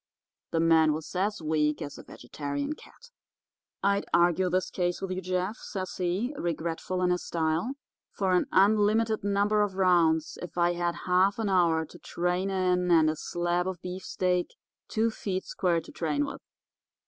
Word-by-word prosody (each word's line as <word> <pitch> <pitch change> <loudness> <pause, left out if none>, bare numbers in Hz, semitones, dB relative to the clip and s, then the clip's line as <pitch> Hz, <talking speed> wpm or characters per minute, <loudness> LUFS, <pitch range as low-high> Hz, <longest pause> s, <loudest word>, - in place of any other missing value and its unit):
The 165 - 0
man 160 -2 +4
was 155 +3 -6
as 195 -1 -1
weak 150 -1 +1
as 145 -3 -7
a - - -10
vegetarian 145 - -5
cat. 475 +9 -17 0.7
"'I'd 200 0 +1
argue 175 +1 +3
this 185 +1 0
case 175 -1 -1
with 195 - -4
you, 185 0 -2
Jeff,' 185 +3 -2
says 185 -3 -5
he, 185 +9 -1
regretful 170 +2 -2
in 180 - +3
his 180 - 0
style, 165 +9 -1 0.4
'for 190 -2 -1
an 180 - +2
unlimited 215 +2 +3
number 205 +1 +2
of 205 -2 0
rounds 170 -4 +2
if 180 - -8
I 175 0 +3
had 175 0 -2
half 185 +2 +3
an 220 -3 -1
hour 170 -4 +3
to - - -14
train 180 +2 -1
in 180 -1 +1
and 160 -2 +5
a - - -5
slab 175 +3 -1
of 185 -2 -4
beefsteak 180 0 -1 0.4
two 225 +1 +1
feet 190 -3 -3
square 175 -3 0
to - - -13
train 150 -3 -1
with. - - -7
180 Hz, 170 wpm, -28 LUFS, 165-195 Hz, 0.7 s, and